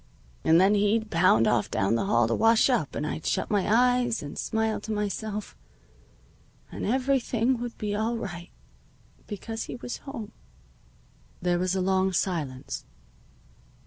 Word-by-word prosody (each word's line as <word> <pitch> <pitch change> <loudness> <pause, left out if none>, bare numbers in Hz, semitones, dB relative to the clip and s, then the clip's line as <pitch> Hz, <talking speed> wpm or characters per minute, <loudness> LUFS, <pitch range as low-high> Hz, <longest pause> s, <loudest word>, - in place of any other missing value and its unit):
"And 160 +1 +5
then 190 +3 +5
he'd 210 +2 +1
pound 165 -10 +4
off 105 - +1
down 95 +3 +1
the 115 - +1
hall 120 -1 +3
to 115 - 0
wash 225 - +4
up, 155 - 0
and 150 - -2
I'd 155 - -4
shut - - -1
my 205 -1 +1
eyes, 245 -1 +3
and 145 - -7
smile 220 -1 -1
to 220 - -6
myself, 210 0 -3 1.2
and - - -4
everything 255 -1 +1
would 240 -1 -5
be 210 -1 -3
all 225 +3 -1
right, 175 -5 -6 0.8
because 225 +2 -5
he - - -6
was 245 0 -6
home." 230 -7 -8 1.1
There 175 -1 +1
was 185 +1 0
a 190 - 0
long 190 0 +1
silence. 155 -9 -2
210 Hz, 150 wpm, -27 LUFS, 175-230 Hz, 1.2 s, And